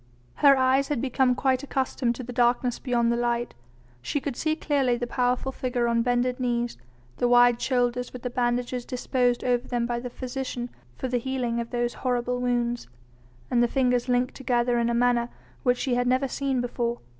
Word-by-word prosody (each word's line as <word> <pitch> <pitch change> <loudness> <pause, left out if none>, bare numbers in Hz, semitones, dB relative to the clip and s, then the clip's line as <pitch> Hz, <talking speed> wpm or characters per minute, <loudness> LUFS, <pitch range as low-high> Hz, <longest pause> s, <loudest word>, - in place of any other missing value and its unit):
Her 280 -2 +6
eyes 260 +1 +3
had 290 -4 -1
become 255 0 +2
quite 260 0 +1
accustomed 260 -3 -1
to 255 - -6
the 245 +1 -7
darkness 245 0 +2
beyond 235 -2 +1
the - - +1
light. 240 0 -1 0.5
She 290 - -1
could 275 -2 -4
see 310 +4 0
clearly 275 -6 +1
the 245 - -2
powerful 250 +2 0
figure 250 -2 -1
on 235 0 +2
bended 245 +1 0
knees, 240 -1 -1 0.4
the 245 - +2
wide 245 0 +5
shoulders 245 -1 0
with 250 - -9
the 250 - -3
bandages 245 0 -1
disposed 245 0 0
over 245 0 0
them 240 -2 -1
by 235 0 -2
the 250 +1 -6
physician 250 -1 -5 0.2
for 260 - -3
the 245 -1 0
healing 245 -2 -2
of 235 0 -4
those 240 -1 -1
horrible 245 -1 0
wounds, 240 - -1 0.6
and 240 - +3
the 240 - +4
fingers 250 -1 +1
linked 250 0 +1
together 240 -2 +1
in 235 0 +1
a 235 - 0
manner 240 0 +2 0.3
which 250 -2 +2
she 255 0 -1
had 245 0 +1
never 255 +2 +2
seen 270 -1 -1
before. 240 -1 -2
245 Hz, 190 wpm, -26 LUFS, 240-255 Hz, 0.6 s, Her